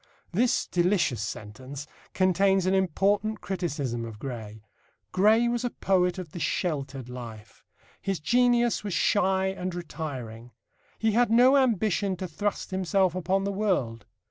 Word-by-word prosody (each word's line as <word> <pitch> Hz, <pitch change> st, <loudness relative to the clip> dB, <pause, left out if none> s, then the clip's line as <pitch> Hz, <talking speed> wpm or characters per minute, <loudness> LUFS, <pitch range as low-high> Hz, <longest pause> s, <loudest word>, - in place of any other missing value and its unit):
This 230 Hz, +7 st, +2 dB
delicious 175 Hz, -, +1 dB
sentence 130 Hz, +6 st, -7 dB, 0.3 s
contains 190 Hz, 0 st, +3 dB
an 185 Hz, -, +2 dB
important 200 Hz, +3 st, +1 dB
criticism 145 Hz, -11 st, -3 dB
of 115 Hz, -2 st, -7 dB
Gray. 110 Hz, -4 st, -7 dB, 0.5 s
Gray 215 Hz, +5 st, +4 dB
was 240 Hz, 0 st, -1 dB
a 245 Hz, -, 0 dB
poet 185 Hz, -4 st, +1 dB
of 180 Hz, -5 st, -7 dB
the 175 Hz, -, -7 dB
sheltered 140 Hz, -8 st, -2 dB
life. 115 Hz, -4 st, -10 dB, 0.4 s
His 195 Hz, -2 st, -2 dB
genius 240 Hz, +6 st, +2 dB
was 205 Hz, -4 st, -3 dB
shy 190 Hz, -1 st, +2 dB
and 185 Hz, -1 st, -4 dB
retiring. 125 Hz, -9 st, -6 dB, 0.4 s
He 220 Hz, 0 st, +1 dB
had 240 Hz, +2 st, +3 dB
no 250 Hz, +4 st, +6 dB
ambition 215 Hz, -6 st, +2 dB
to 185 Hz, +1 st, -5 dB
thrust 205 Hz, +6 st, -3 dB
himself 190 Hz, -1 st, +1 dB
upon 185 Hz, +2 st, 0 dB
the 200 Hz, -, -1 dB
world. 160 Hz, -, -1 dB
185 Hz, 140 wpm, -27 LUFS, 140-205 Hz, 0.5 s, no